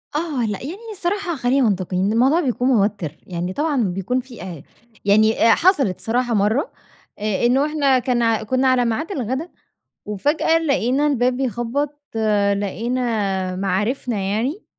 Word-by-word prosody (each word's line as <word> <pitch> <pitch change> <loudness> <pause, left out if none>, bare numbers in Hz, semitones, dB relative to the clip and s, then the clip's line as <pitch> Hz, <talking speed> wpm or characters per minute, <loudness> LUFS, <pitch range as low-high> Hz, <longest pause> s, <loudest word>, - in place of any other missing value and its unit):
آه 300 -6 -1
لأ 205 -2 -3
يعني 280 - -4
ني 450 +2 -10
الصراحة 380 -2 -2
خلّينا 250 -1 +2
منطقيين، 185 0 -1
الموضوع 265 +8 +3
بيكون 250 -5 0
موتر 205 - +1 0.2
يعني 180 0 -3
طبعًا 290 -2 0
بيكون 195 +6 -1
في 250 -4 -10
أ 170 -6 -8 0.4
يعني 215 +3 +4
أ - - +6
حصلت 295 - +2
صراحة 240 +1 0
مرّة 215 +7 +1 0.5
آآ 210 +1 0
إنه 260 +4 +3
إحنا 285 -4 +2
كان 245 -1 0
ع 225 -1 +1
كنّا 260 +4 +1
على 255 -1 +3
ميعاد 235 - -2
الغدا 265 - -3 0.6
وفاجأة 290 - +1
لقينا 280 -3 +1
الباب 250 -3 +1
بيخبط 270 +4 -2 0.5
لقينا، 205 -2 -1
مَعارفنا 210 +6 -1
يعني 225 - -2
245 Hz, 145 wpm, -21 LUFS, 205-280 Hz, 0.6 s, أ